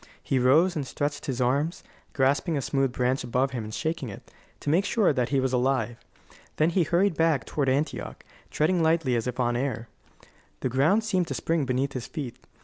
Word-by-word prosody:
He 135 - +1
rose 155 +9 +4
and 145 -4 -3
stretched 145 +1 -3
his 130 -2 -2
arms, 140 +7 0 0.3
grasping 145 +4 +1
a - - -1
smooth 135 -2 0
branch 125 +2 0
above 125 +2 0
him 120 -4 -4
and 105 - -7
shaking 155 0 -3
it, 100 - -11 0.3
to 145 - -1
make 175 +5 +3
sure 200 -4 +2
that 125 -3 0
he 140 - +2
was 130 -1 0
alive. 125 -2 0 0.5
Then 155 +2 +2
he 180 - +2
hurried 175 +4 +2
back 160 -5 +2
toward 140 -3 -1
Antioch, 140 +4 -2 0.2
treading 170 +3 +1
lightly 160 -5 +2
as 115 +1 -1
if 125 0 -4
on 120 -1 +1
air. 120 -3 -2 0.7
The 130 - 0
ground 150 - +3
seemed 185 -5 0
to 135 - -3
spring 155 +5 0
beneath 130 +2 -1
his 125 -3 -5
feet. 140 -8 -5
135 Hz, 200 wpm, -26 LUFS, 125-160 Hz, 0.7 s, rose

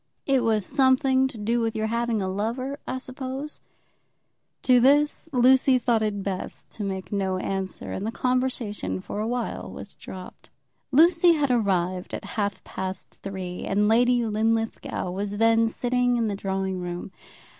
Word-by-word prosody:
"It 270 -3 +2
was 220 -3 +1
something 265 0 +3
to 255 - -9
do 225 +3 0
with 225 -1 -1
your 220 - 0
having 230 -2 0
a - - -1
lover, 235 +8 -2
I 260 - -2
suppose." 260 +3 -6 1.0
To 250 -1 +6
this 290 +5 +3
Lucy 260 +1 +5
thought 235 -2 +1
it 205 -2 -1
best 190 -2 -5
to 215 - -4
make 190 -1 -4
no 190 -2 0
answer, 190 0 -3
and 190 - -4
the 220 - -2
conversation 240 - -1
for 205 - -6
a 215 - -1
while 240 -1 -3
was 200 - -8
dropped. 185 -1 -11 0.4
Lucy 335 +4 +6
had 290 -4 +1
arrived 185 -5 0
at - - -7
about 200 - -8
half 205 -2 -2
past 190 0 -6
three, 185 -2 -5
and 205 +1 +1
Lady 240 +2 +4
Linlithgow 225 -3 -1
was 200 +2 -3
then 225 +1 +4
sitting 245 +1 +1
in 230 -2 +1
the 200 - -2
drawing 190 -1 -2
room. 175 +1 -5
225 Hz, 165 wpm, -25 LUFS, 195-255 Hz, 1.0 s, To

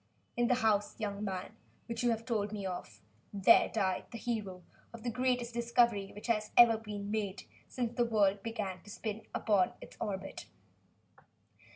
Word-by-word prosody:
In 240 0 +2
the 250 - +4
house, 215 -4 +1
young 205 -1 -3
man, 190 +1 -4 0.3
which 235 - -4
you 245 - +3
have 225 -1 -1
told 210 -4 -1
me 205 -2 -4
of, 180 - -6 0.3
there 200 +3 +6
died 190 -4 0
the 235 - -7
hero 210 -6 -3 0.3
of 235 -1 -10
the 240 - -1
greatest 250 -1 0
discovery 235 -4 +2
which 210 - -9
has 215 -3 0
ever 235 -1 +9
been 210 -2 -5
made 200 -3 -2 0.2
since 240 -2 -3
the 240 -1 +2
world 205 -3 +2
began 210 -4 -4
to 205 - -15
spin 215 +1 -5
upon 200 -4 +2
its - - -12
orbit." 195 -1 -4
215 Hz, 170 wpm, -33 LUFS, 200-235 Hz, 0.3 s, ever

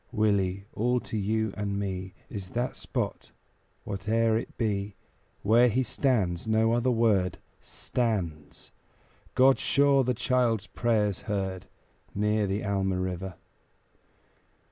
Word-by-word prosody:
Willie, 100 -3 +1
all 125 +3 +1
to - - -6
you 110 0 0
and 100 -1 -2
me 95 -2 -4
Is 95 -3 -6
that 125 +1 -1
spot, - - -4 0.6
whate'er 110 +3 +1
it 115 - -4
be, 100 -3 -1 0.5
Where 115 +4 +5
he 125 +3 +1
stands 110 -8 0
no 110 +1 +3
other 120 +2 +2
word 110 -7 +2 0.2
Stands 90 -11 -3 0.6
God 130 +1 +5
sure 140 -1 +3
the 125 0 0
child's 120 -3 +1
prayers 105 -5 0
heard 95 -3 -2 0.5
Near 105 0 +1
the 100 +3 -2
Alma 95 -2 0
River. 95 0 -3
105 Hz, 120 wpm, -28 LUFS, 95-115 Hz, 0.6 s, Where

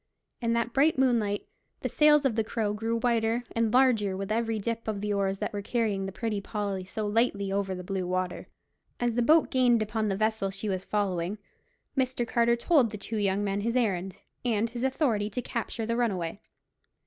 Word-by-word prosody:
In 230 -1 +1
that 235 0 0
bright 295 +3 +3
moonlight 230 -6 +1 0.4
the - - -1
sails 300 -1 +4
of 265 - +3
the 225 0 +1
Crow 215 -1 -1
grew 225 +2 -1
whiter 230 0 +1
and 230 -1 +1
larger 225 -7 +3
with 195 +1 -4
every 225 0 0
dip 230 +2 -3
of 215 -2 -2
the 210 0 -1
oars 195 -1 0
that - - -3
were 205 - -3
carrying 205 -3 -1
the - - -5
Pretty 210 0 -2
Polly 200 -3 -3
so 215 +3 -4
lightly 205 -2 +1
over 195 -1 -1
the 180 - -7
blue 185 -1 -3
water. 185 0 -2 0.5
As 240 -1 +1
the 240 - +1
boat 315 +6 +4
gained 245 -4 +4
upon 215 +1 -1
the 195 -2 -1
vessel 215 -2 0
she 195 +2 -5
was 190 -2 -2
following, 195 -2 -1 0.6
Mr. 255 -3 0
Carter 235 0 +3
told 255 0 +3
the 210 - -6
two 220 +2 -4
young 200 -1 +1
men 200 0 -1
his 230 +3 -1
errand, 195 -6 -1 0.2
and 230 -2 0
his 240 0 -4
authority 255 -6 +1
to 215 - -4
capture 230 0 -3
the 230 +1 -1
runaway. 200 -6 -1
220 Hz, 200 wpm, -28 LUFS, 200-235 Hz, 0.6 s, sails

